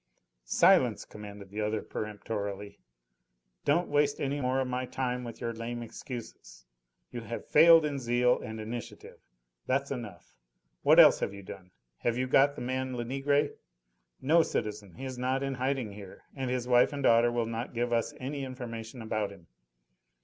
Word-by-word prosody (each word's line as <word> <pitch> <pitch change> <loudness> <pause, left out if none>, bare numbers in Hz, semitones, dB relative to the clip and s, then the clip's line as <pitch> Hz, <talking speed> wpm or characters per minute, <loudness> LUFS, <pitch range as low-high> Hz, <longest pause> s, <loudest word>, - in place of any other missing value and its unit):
"Silence!" - - +4
commanded 100 -2 -10
the 105 +1 -3
other 105 0 -1
peremptorily. 105 -1 -5 0.9
"Don't 170 +5 +2
waste 145 0 +1
any 140 +1 -1
more 130 +1 +1
of 130 - 0
my 125 0 -2
time 125 -1 -2
with 115 -1 -8
your 115 - -3
lame 120 +1 -5
excuses. 115 - -9 0.5
You 120 - -5
have 115 +1 -6
failed 165 +1 +7
in 145 -2 -2
zeal 125 0 +2
and 110 +1 -6
initiative. 115 +2 -7 0.5
That's 135 +2 0
enough. 105 -10 -7 0.5
What - - +6
else - - +8
have 100 - -2
you 100 - -10
done? 95 -1 -10 0.3
Have 120 0 0
you 130 - 0
got 140 +2 +4
the - - -7
man 130 +1 -2
Lenegre?" 135 +4 +1 0.7
"No, 160 +5 +4
citizen. 105 - -3
He 135 - -7
is 130 -1 -6
not 130 +2 0
in 135 0 -1
hiding 130 -3 -1
here, 100 -2 -11
and 135 -2 -3
his 125 -1 -2
wife 125 +2 +5
and 140 -1 -4
daughter 115 -1 +5
will 120 -1 0
not 115 +2 -5
give 120 0 0
us 115 -1 +1
any 140 +2 -4
information 120 -2 -7
about 110 -2 -1
him." 95 -4 -14
120 Hz, 170 wpm, -30 LUFS, 110-135 Hz, 0.9 s, else